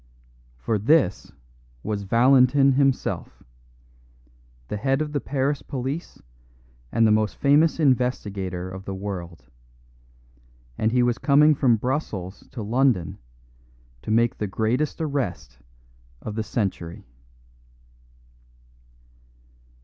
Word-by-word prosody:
For 85 - -1
this 110 - +2 0.5
was 105 -1 -3
Valentin 130 +6 +4
himself, 135 0 -1 1.2
the 105 - -4
head 135 +6 0
of 155 -1 -2
the 145 - -1
Paris 140 +1 -1
police 135 +4 -5 0.7
and 115 - +3
the 110 - +4
most 110 -1 +1
famous 150 +4 +3
investigator 100 - 0
of 95 +1 -9
the 95 - -5
world; 90 -6 -6 1.3
and 110 - 0
he 125 0 +3
was 120 -1 0
coming 150 +2 +5
from 130 -4 +3
Brussels 105 - -4
to 115 - -6
London 115 - +1 0.8
to - - -8
make 115 +2 +2
the 105 - -1
greatest 115 - -1
arrest 130 - -3 0.6
of 110 - -5
the 110 - -2
century. 95 -6 -4
120 Hz, 105 wpm, -24 LUFS, 100-135 Hz, 1.3 s, coming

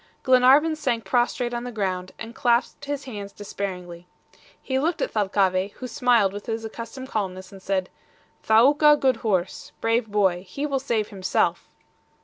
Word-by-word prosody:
Glenarvan 265 +5 +5
sank 240 -7 -2
prostrate 240 +3 0
on 240 0 -3
the 245 - -5
ground, 185 -4 -3
and 225 +1 -8
clasped 240 +4 0
his 285 0 -4
hands 205 -6 -7
despairingly. 180 -4 -6 0.5
He 265 0 -2
looked 320 +4 0
at - - -1
Thalcave, 195 -2 +1
who 255 - -7
smiled 230 -4 +2
with 205 0 -8
his 225 0 -3
accustomed 230 +4 -8
calmness, 185 -3 -4
and 195 -1 -12
said: 190 -1 -1 0.5
"Thaouka, 290 +7 +5
good 260 -3 +2
horse. 190 -6 -2
Brave 225 0 +1
boy. 190 -4 +1
He 280 +10 -3
will 275 -2 -1
save 230 -5 -1
himself!" 190 -2 -1
225 Hz, 155 wpm, -24 LUFS, 195-255 Hz, 0.5 s, Glenarvan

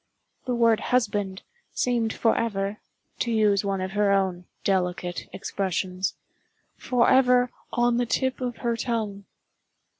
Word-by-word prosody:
The 250 - 0
word 230 -2 +4
"husband" 205 -6 0 0.3
seemed 235 -3 +1
forever—to 215 +1 -2
use 210 -3 +3
one 195 -1 -1
of 185 0 -3
her 205 0 +2
own 190 -2 +1 0.2
delicate 180 -2 -1
expressions—forever 235 +7 0 0.2
"on 240 0 +2
the 245 -1 0
tip 260 +2 0
of 245 -2 -3
her 235 -1 +2
tongue." 220 -4 -3
215 Hz, 110 wpm, -26 LUFS, 195-240 Hz, 0.3 s, word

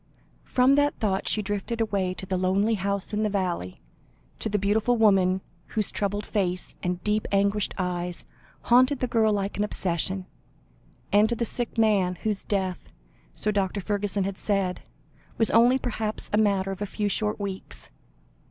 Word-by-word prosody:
From 255 +2 +4
that 290 0 +3
thought, 195 -3 -1
she 215 - +1
drifted 205 +3 -3
away 200 -5 0
to 190 - -7
the 185 - -2
lonely 190 +4 +2
house 200 0 -1
in 210 - 0
the 215 - +1
valley, 180 - -2 0.6
to 220 - -2
the 210 - +1
beautiful 215 +4 +2
woman 190 -4 +4 0.4
whose 215 - +2
troubled 205 0 -2
face 185 -4 -1
and 180 0 -2
deep, 210 0 0
anguished 200 +1 +1
eyes 180 -1 -2 0.4
haunted 255 +4 +4
the 255 - -1
girl 225 -3 +2
like 200 -1 -1
an 205 - +1
obsession, 185 -1 -1 0.9
and 210 +2 +5
to 235 - 0
the 235 - -1
sick 240 +1 -3
man, 200 -5 +3
whose 210 -2 -1
death, 190 -3 -2 0.5
so 210 - 0
Dr. 200 -1 0
Fergusson 205 0 -1
had 195 0 -3
said, 195 -3 0 0.6
was 225 - +3
only 240 +3 +5
perhaps 220 -4 -3
a - - +4
matter 195 -2 +2
of 195 - -7
a 205 - -1
few 210 +1 -2
short 210 +1 0
weeks. 195 -2 -5
205 Hz, 170 wpm, -26 LUFS, 190-215 Hz, 0.9 s, and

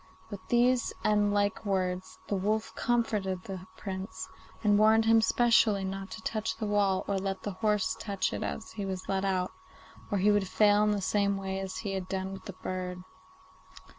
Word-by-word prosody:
With 205 - -5
these 245 +1 +3
and 210 -1 +3
like 205 0 +1
words 185 -2 -2
the 205 - 0
wolf 215 +3 -1
comforted 210 -6 0
the 190 -1 -7
Prince, 190 +1 -5 0.4
and 205 -1 +4
warned 220 +1 +5
him 225 0 +6
specially 225 -3 +4
not 195 0 -5
to 225 - -9
touch 215 -1 -2
the 220 - -3
wall 200 -2 +1
or 200 -1 0
let 195 0 -3
the 205 - -2
horse 210 +1 0
touch 200 - -1
it 105 - -3
as 70 - -4
he 205 - -5
led 190 -1 -3 0.2
it - - 0
out, 185 -1 0 0.6
or 205 - 0
he 200 +2 +4
would 205 -2 +2
fail 205 +1 +4
in 210 - +3
the 205 -1 0
same 200 +1 +1
way 190 0 -3
as 190 -1 -5
he 200 - -3
had 190 -1 -4
done 190 0 -3
with 190 - -9
the 195 - -6
bird. 180 0 -5
200 Hz, 195 wpm, -30 LUFS, 190-210 Hz, 0.6 s, him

